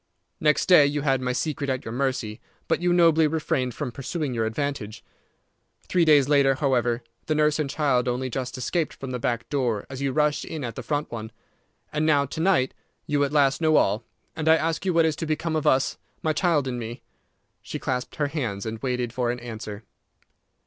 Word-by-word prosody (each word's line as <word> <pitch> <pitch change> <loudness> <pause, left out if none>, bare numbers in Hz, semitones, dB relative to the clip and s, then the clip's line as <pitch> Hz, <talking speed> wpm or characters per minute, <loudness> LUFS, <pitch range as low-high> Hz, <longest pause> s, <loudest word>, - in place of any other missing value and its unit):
Next 150 -1 +3
day 155 -6 +7
you 145 +1 -1
had 135 -3 +2
my 125 0 -1
secret 140 +2 -2
at 130 -1 -2
your 110 - -5
mercy, 125 -4 -2 0.3
but - - +1
you 175 0 +2
nobly 165 -2 +5
refrained 135 -5 -1
from 125 - -3
pursuing 140 +2 -3
your 115 -2 0
advantage. 120 -2 -4 0.8
Three 175 -2 +2
days 145 -4 +5
later, 140 -2 +4
however, 125 -4 +1 0.2
the 155 - +1
nurse 150 0 +2
and 150 -2 -1
child 135 -4 +1
only 125 +1 -1
just 130 0 -4
escaped 155 +5 -1
from 135 -1 -7
the 125 - -3
back 120 -1 -2
door 125 -8 0
as 130 0 -6
you 140 -1 0
rushed 150 +1 +1
in 155 -3 -5
at 120 -2 -4
the 130 - -5
front 145 +5 -2
one. 110 -1 -6 0.6
And 150 0 0
now 145 -3 +3
to 140 +4 -7
night 165 -7 +2 0.3
you 145 -1 +1
at 140 - 0
last 140 -1 +3
know 155 -1 +4
all, 105 -1 +3 0.3
and 160 0 0
I 160 - +8
ask 165 +2 -1
you 185 - +2
what 165 -1 +5
is 160 -2 +1
to 165 - -3
become 160 +1 -1
of 155 - 0
us, 130 +1 +2 0.2
my 155 - +2
child 155 -6 +2
and 125 -1 -3
me?" 115 +2 -7 0.6
She - - -6
clasped 125 -1 -3
her 150 - 0
hands 125 -10 -3
and 110 0 -4
waited 125 -3 -2
for 125 -2 0
an 120 +1 -2
answer. 110 -3 -7
140 Hz, 210 wpm, -25 LUFS, 125-155 Hz, 0.8 s, I